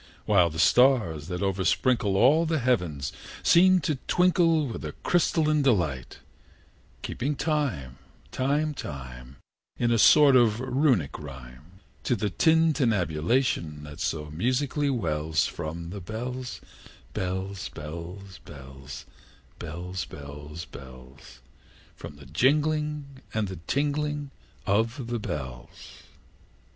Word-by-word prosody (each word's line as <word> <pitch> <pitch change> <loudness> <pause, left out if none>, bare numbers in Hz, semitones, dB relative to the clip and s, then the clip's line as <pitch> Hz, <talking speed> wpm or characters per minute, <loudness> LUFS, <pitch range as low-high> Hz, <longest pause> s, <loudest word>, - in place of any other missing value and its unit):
While 90 -5 +4
the 80 - -8
stars, 85 - +3
that 90 0 -4
oversprinkle 100 +3 +1
All 150 +9 +5
the 160 0 +1
heavens, 90 - 0 0.3
seem 185 +2 +6
to 145 -2 -1
twinkle 170 -3 +3
With 120 - -6
a - - -5
crystalline 155 -3 +2
delight; 85 - 0 0.9
Keeping 145 +4 -2
time, 125 - -2 0.3
time, 145 +4 0
time, 65 - -8 0.4
In 120 -1 +1
a 115 - +3
sort 145 +3 +7
of 115 -3 +4
Runic 130 - +1
rhyme, 70 +6 -12 0.2
To 125 - +2
the 105 -2 -2
tintinnabulation 115 - +1
that 75 +1 -10
so 75 -3 -3
musically 130 - 0
wells 80 - 0
From 85 +1 -5
the 100 0 -6
bells, 125 +6 -5 0.5
bells, 95 +1 -3
bells, 85 +5 -8
bells, 70 -1 -11 0.5
Bells, 90 +3 -5
bells, 75 +2 -9
bells 65 -1 -13 0.5
From - - -10
the 70 -1 -14
jingling 150 - 0
and 110 -2 0
the 95 -3 -7
tinkling 145 0 -1 0.3
of 115 +6 0
the 120 - -1
bells. 65 - -7
100 Hz, 110 wpm, -27 LUFS, -, 0.9 s, sort